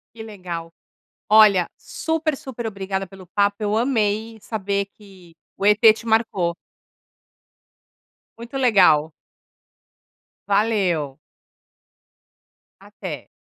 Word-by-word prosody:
Que 220 - -8
legal. 175 -6 -7 0.6
Olha, 210 -5 +6
super, 320 -2 -2
super 240 -4 -6
obrigada 195 -2 -4
pelo 190 -1 -14
papo, 200 +2 +1
eu 210 0 -1
amei 225 -2 0
saber 200 -2 -2
que 190 -5 -18 0.2
o 195 - -3
ET 210 0 +5
te 230 - -12
marcou. 210 -7 +1 1.8
Muito 235 +4 -10
legal. 180 - +4 1.4
Valeu. 195 -9 0 1.6
Até. - - -8
205 Hz, 90 wpm, -22 LUFS, 185-225 Hz, 1.8 s, Olha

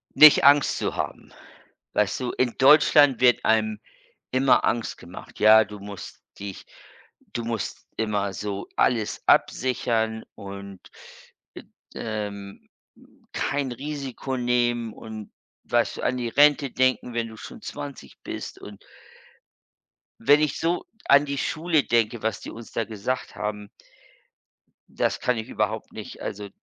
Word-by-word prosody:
Nicht 155 -1 +9
Angst 140 0 +5
zu - - -2
haben. - - -5 0.6
Weißt 105 +3 +1
du, 125 -1 -2
in 125 -2 0
Deutschland 145 -1 +6
wird 125 -2 +4
einem 110 -1 +1 0.5
immer 130 +1 +4
Angst 120 -1 -1
gemacht. - - -12
Ja, 110 +1 +7
du 105 0 -10
musst 100 -1 -10 0.2
dich 100 -1 -8 0.7
du 120 - -3
musst 115 -2 -4
immer 105 -3 -1
so 100 +1 -5
alles 115 -4 +1
absichern 110 -3 +1
und, 100 -1 -9 1.2
äh 110 -2 -3
ähm, 100 -1 -10 0.6
kein 140 -3 -1
Risiko 135 -1 -5
nehmen 120 -2 0
und 110 -1 -9 0.3
weißt - - 0
du, - - -6
an 125 - 0
die 120 -1 -2
Rente 145 +2 +4
denken, 130 -1 +1
wenn 115 -1 -1
du 110 - -11
schon 240 - -10
20 140 -1 -8
bist - - -6
und 105 -1 -10 1.4
wenn 145 +6 +5
ich 150 -3 0
so 170 +2 0 0.2
an 140 +1 +6
die 140 0 -3
Schule 160 +1 +1
denke, 115 -1 +1
was 110 -2 -1
die - - -8
uns 115 0 -11
da 115 - -1
gesagt 110 +4 -4
haben 105 -1 -4 1.2
das - - -1
kann 125 - +1
ich 110 - -6
überhaupt 110 +1 -2
nicht. 110 - -9
Also, 105 0 -5
115 Hz, 135 wpm, -25 LUFS, 105-130 Hz, 1.4 s, Nicht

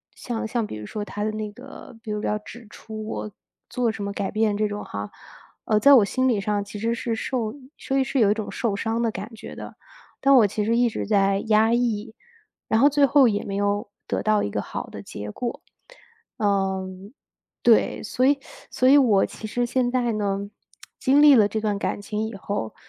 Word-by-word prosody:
像 230 -2 -4
像 230 0 -1
比 - - -7
如 105 0 -7
说 210 -1 -5
他 205 0 -5
的 215 - 0
那 215 -1 -5
个 250 +1 -12
比 220 - -10
如 210 0 -2
要 210 - 0
指 230 +2 -12
出 215 0 -8
我 210 - -5 0.4
做 245 -3 0
什 210 -2 -6
么 200 - -3
改 200 -1 -3
变 215 -1 +1
这 215 0 +1
种 205 0 -5
哈， 100 0 -6 0.5
呃， 210 -1 +2
在 280 +5 +7
我 235 -6 +8
心 255 +6 0
理 215 -5 +1
上 205 -1 -1
其 205 0 -8
实 230 +2 0
是 230 -1 -2
受 225 -2 -2 0.2
所 270 - -2
以 270 - +3
是 265 0 -1
有 205 -2 +5
一 - - +4
种 215 -1 -5
受 230 -5 -1
伤 225 +3 -1
的 230 - +1
感 210 +3 -7
觉 - - -10
的。 - - -9 0.4
但 275 - +4
是 270 - +8
我 215 - +5
其 210 +1 -2
实 230 - +2
一 240 0 +3
直 - - -4
在 195 -2 +2
压 220 +1 +4
抑， 225 -2 -1 0.5
然 220 - +2
后 285 - +7
最 290 0 +4
后 275 -2 +5
也 205 -2 0
没 195 - -4
有 205 +1 0 0.2
得 - - -2
到 215 -1 +2
一 - - -1
个 - - -2
好 - - -6
的 - - -9
结 105 0 -7
果， 240 -1 -5 0.8
嗯， 195 -1 -1 0.5
对。 235 -2 +3
所 255 +4 0
以 280 0 +4 0.3
所 255 - +1
以 280 +2 +7
我 220 -8 +4
其 220 - -7
实 245 +3 -1
现 245 0 0
在 245 -2 0
呢， 200 -1 -2 0.5
经 280 +2 +4
历 295 -2 +8
了 210 -4 +5
这 220 - -3
段 210 -2 -1
感 205 - -3
情 215 +1 -3
以 225 - -8
后， 195 - -4
215 Hz, 240 characters per minute, -24 LUFS, 205-240 Hz, 0.8 s, 我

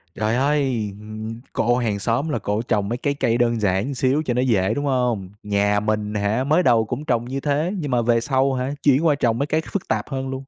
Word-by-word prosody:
trời 110 +2 0
ơi! 135 -5 +1
Ừm, 110 +2 -7
cô 120 +2 +2
hàng 110 -5 -1
xóm 120 +9 0
là - - -1
cổ 105 +2 -1
trồng 105 -3 -1
mấy 120 - -1
cái 140 +3 -1
cây 120 -4 0
đơn 120 -2 +1
giản 95 -1 +1
một 140 - -3
xíu 130 +4 +1
cho 125 - 0
nó 125 - +1
dễ, 105 -7 +2
đúng 145 0 -2
không? 125 -8 0
Nhà 100 0 +1
mình 105 0 -1
hả 105 +5 0
mới 155 +6 +2
đầu 115 -6 +4
cũng 125 +6 -5
trồng 120 -3 0
như 135 +2 -3
thế 150 +6 0
nhưng 145 -4 -3
mà 120 -1 +2
về 115 0 +2
sau 135 0 +1
hả, 130 +2 -2
chuyển 145 +3 +4
qua 150 -3 +4
trồng 120 -4 +1
mấy 140 - +1
cái 155 +1 +1
phức 200 - -3
tạp - - -1
hơn 135 -1 -3
luôn. 135 0 -5
120 Hz, 250 wpm, -22 LUFS, 110-135 Hz, -, đầu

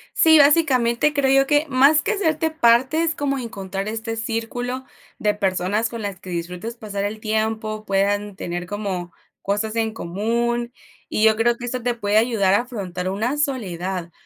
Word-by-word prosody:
Sí, 320 -1 +6
básicamente, 285 -3 +4
creo 275 -2 +2
yo 270 - -1
que, 295 +2 +3
más 275 +4 +5
que 440 - 0
hacerte 320 -5 0
parte, 265 +3 +3
es 325 -1 +1
como 280 -1 -1
encontrar 195 -5 -5
este 225 +1 -4
círculo 240 +3 -3 0.3
de 210 0 +2
personas 200 +2 0
con 230 -2 -6
las 200 -3 -5
que 185 -2 -11
disfrutes 180 +6 -5
pasar 205 -3 -5
el 210 +2 -3
tiempo, 215 0 -2
puedan 200 +1 0
tener 175 -1 -4
como 195 -4 -4 0.3
cosas 210 +2 -1
en 225 -1 0
común. 235 +6 -2 0.4
Y 215 - 0
yo 220 -1 +6
creo 235 +2 +2
que 245 - -6
esto 250 0 -4
te 245 0 +1
puede 210 -2 0
ayudar 220 -5 +3
a 205 - +4
afrontar 185 -7 -5
una 230 +9 -1
soledad, 190 - -2
225 Hz, 175 wpm, -22 LUFS, 200-250 Hz, 0.4 s, Sí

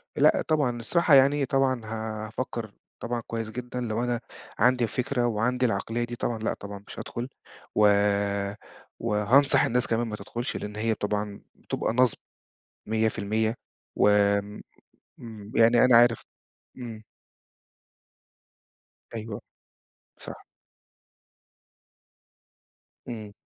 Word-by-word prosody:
لأ، - - +4
طبعًا، 140 -6 +1
الصراحة 165 +6 +2
يعني، 140 +1 +5
طبعًا 130 -2 +1
هافكّر 110 +1 -5 0.3
طبعًا 120 0 -3
كويس 115 -1 -4
جدًا 125 +1 -5
لو 115 0 -2
أنا 120 -1 -1 0.4
عندي 125 -1 +4
الفكرة 125 +1 -1
وعندي 125 +3 0
العقلية 115 +2 -1
دي 120 0 -5
طبعًا، 115 -1 -2
لأ، 110 - -1
طبعًا 100 0 -9
مش - - -8
هادخُل 120 +3 -5 0.5
و 105 -1 +6 1.1
وهانصح 115 +5 +4
الناس 125 +1 +1
كمان 115 +1 0
ما 105 - -4
تدخلش 120 +5 -4
لأن 105 0 -6
هي 110 +1 0
طبعًا 105 0 -3
بتبقى - - -3
نصب 125 -2 +3 0.7
100% 110 0 0 0.4
و - - +4
آمم، 100 0 0 0.8
يعني 115 +2 +6
أنا 120 -2 +7
عارف 120 -1 +4 0.5
إمم. 115 -3 -8 2.1
أيوه. 110 -2 -6 0.8
صح. - - -9 2.6
إمم. 110 -4 -7
115 Hz, 105 wpm, -26 LUFS, 110-125 Hz, 2.6 s, أنا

